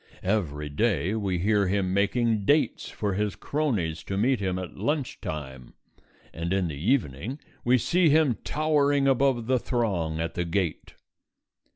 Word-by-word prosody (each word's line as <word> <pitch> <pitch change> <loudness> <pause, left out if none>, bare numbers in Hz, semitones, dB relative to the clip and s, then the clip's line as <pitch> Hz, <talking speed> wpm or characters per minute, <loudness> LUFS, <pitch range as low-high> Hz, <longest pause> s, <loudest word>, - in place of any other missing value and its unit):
Every 80 -7 -1
day 100 +3 0
we 100 -5 -1
hear 100 +2 +2
him 95 -1 0
making 105 +2 +1
dates 145 +9 +1
for 105 -2 -2
his 105 -1 -1
cronies 100 - -1
to 95 - -3
meet 125 +5 +2
him 95 -2 -1
at 90 -2 -6
lunch 140 +6 -2
time, 65 -5 -7 0.6
and 85 +1 -4
in 95 -2 +1
the 75 - -5 0.2
evening 115 - -1 0.3
we 125 +1 +4
see 175 +6 +3
him 145 -7 +3
towering 145 -2 +2
above 135 -3 +2
the 130 +1 +2
throng 95 -11 -1
at 80 0 -2
the 85 - -1
gate. 85 -1 -2
100 Hz, 155 wpm, -26 LUFS, 85-130 Hz, 0.6 s, we